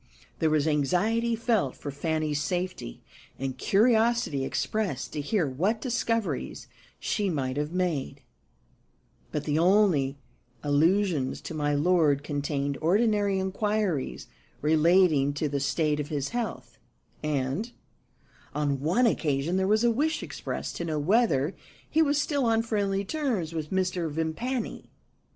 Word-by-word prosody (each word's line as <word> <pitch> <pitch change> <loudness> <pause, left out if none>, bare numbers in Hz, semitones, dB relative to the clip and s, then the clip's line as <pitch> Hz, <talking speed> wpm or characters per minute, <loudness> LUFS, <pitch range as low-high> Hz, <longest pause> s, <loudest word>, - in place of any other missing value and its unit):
There 160 - +3
was 155 0 +2
anxiety 200 - +1
felt 220 - 0
for 145 - -6
Fanny's 155 0 -1
safety, 180 - -3 0.3
and 135 -1 -3
curiosity 225 - +2
expressed 195 - -2
to 150 - -2
hear 180 +4 +1
what 185 - 0
discoveries 230 -3 -2 0.3
she 205 -2 -1
might 130 -6 -2
have 150 +1 -2
made; 160 -7 -2 1.1
but 150 - -2
the 150 +1 0
only 170 -7 +3 0.5
allusions 155 -1 +2
to - - -7
my 145 -1 0
lord 150 -3 +3
contained 145 -1 -2
ordinary 205 +3 +2
inquiries 190 -4 -1 0.3
relating 155 -2 +4
to 150 +1 0
the 140 -1 -1
state 150 +2 0
of 145 0 -3
his 145 -3 -2
health, 240 -1 -5 0.4
and, 150 - -1 0.8
on 145 -2 0
one 175 - +2
occasion, 155 -5 +1
there 190 0 +1
was 215 +2 +3
a 240 - +4
wish 300 +7 0
expressed - - -5
to 170 - -3
know 155 -2 -2
whether 165 - +2 0.3
he 320 - +2
was 290 -2 +3
still 285 -3 0
on 225 -1 +2
friendly 200 -3 -1
terms 230 - -2
with 155 -2 -4
Mr. 185 -3 0
Vimpany. 165 - -3
170 Hz, 135 wpm, -27 LUFS, 145-215 Hz, 1.1 s, relating